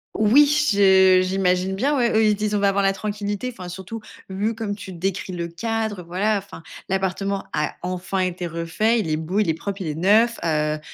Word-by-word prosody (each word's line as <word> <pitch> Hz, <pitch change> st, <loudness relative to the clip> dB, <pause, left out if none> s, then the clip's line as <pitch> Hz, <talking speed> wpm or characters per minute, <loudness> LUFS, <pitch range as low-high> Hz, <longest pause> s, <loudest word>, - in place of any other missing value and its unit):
Oui 230 Hz, +8 st, +5 dB, 0.3 s
je 190 Hz, -2 st, +5 dB
j'imagine 185 Hz, 0 st, 0 dB
bien. 275 Hz, +9 st, +1 dB
Ouais, 235 Hz, -4 st, +2 dB
ils 210 Hz, -, +2 dB
disent: 210 Hz, 0 st, -2 dB
«On -, -, +1 dB
va 200 Hz, 0 st, +3 dB
avoir 200 Hz, 0 st, +1 dB
la 195 Hz, 0 st, +3 dB
tranquillité». 205 Hz, +3 st, -4 dB
Enfin 180 Hz, -4 st, -8 dB
surtout 190 Hz, +5 st, -7 dB, 0.3 s
vu 205 Hz, +4 st, -2 dB
comme 215 Hz, -2 st, -3 dB
tu 195 Hz, -2 st, -9 dB
décris 185 Hz, +1 st, -3 dB
le 170 Hz, -1 st, -3 dB
cadre, 220 Hz, +3 st, -3 dB
heu, -, -, -8 dB
voilà 195 Hz, +5 st, 0 dB
enfin, 195 Hz, -4 st, -9 dB, 0.3 s
l'appartement 195 Hz, +1 st, -1 dB
a 150 Hz, 0 st, -1 dB
enfin 185 Hz, +1 st, -3 dB
été 180 Hz, -1 st, -2 dB
refait. 170 Hz, +8 st, 0 dB
Il 175 Hz, -, -2 dB
est 155 Hz, -, 0 dB
beau, 165 Hz, +6 st, -2 dB
il 210 Hz, -, +1 dB
est -, -, +3 dB
propre, 195 Hz, +5 st, -6 dB
il 180 Hz, -, -4 dB
est 150 Hz, -, -3 dB
neuf, 215 Hz, +8 st, +3 dB
heu, 155 Hz, -1 st, 0 dB
195 Hz, 210 wpm, -22 LUFS, 180-210 Hz, 0.3 s, Oui